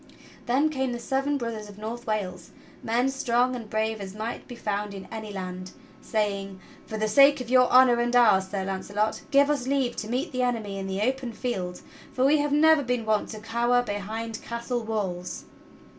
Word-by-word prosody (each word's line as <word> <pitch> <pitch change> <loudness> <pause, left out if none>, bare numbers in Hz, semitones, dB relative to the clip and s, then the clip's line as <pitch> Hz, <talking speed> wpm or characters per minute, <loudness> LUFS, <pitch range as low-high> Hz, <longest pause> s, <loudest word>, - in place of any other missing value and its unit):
Then 270 +6 +3
came 265 -4 -1
the 240 - -4
seven 270 +4 0
brothers 225 -4 -5
of 205 - -12
North 230 +3 -6
Wales 200 -4 -3 0.2
— - - -24
men 245 +3 +3
strong 250 -1 +1
and 230 -3 -7
brave 220 0 -1
as 195 0 -7
might 220 +2 -5
be 245 - -8
found 205 -2 -3
in 190 - -8
any 220 -2 -6
land, 185 -1 -6 0.3
saying: 200 -3 -2 0.3
"For 220 - -4
the 215 0 0
sake 275 +6 +6
of 250 -1 -6
your 255 -1 +5
honor 250 -2 +6
and 240 +1 0
ours. 210 -6 +5
Sir 195 0 -3
Launcelot, 200 +3 -2
give 280 0 +5
us 270 -4 -1
leave 270 -3 +1
to 215 - -4
meet 260 +7 -1
the 255 - -1
enemy 220 -5 -1
in 195 - -4
the 190 +1 -2
open 255 +1 -1
field; 190 -7 -4 0.3
for 255 - +2
we 295 +2 +5
have 290 0 0
never 315 +1 +5
been 245 -3 -1
wont 215 -1 +1
to 215 - -7
cower 240 +2 +1
behind 220 +1 -4
castle 235 +1 -3
walls!" 195 -5 -3
230 Hz, 200 wpm, -26 LUFS, 205-250 Hz, 0.3 s, sake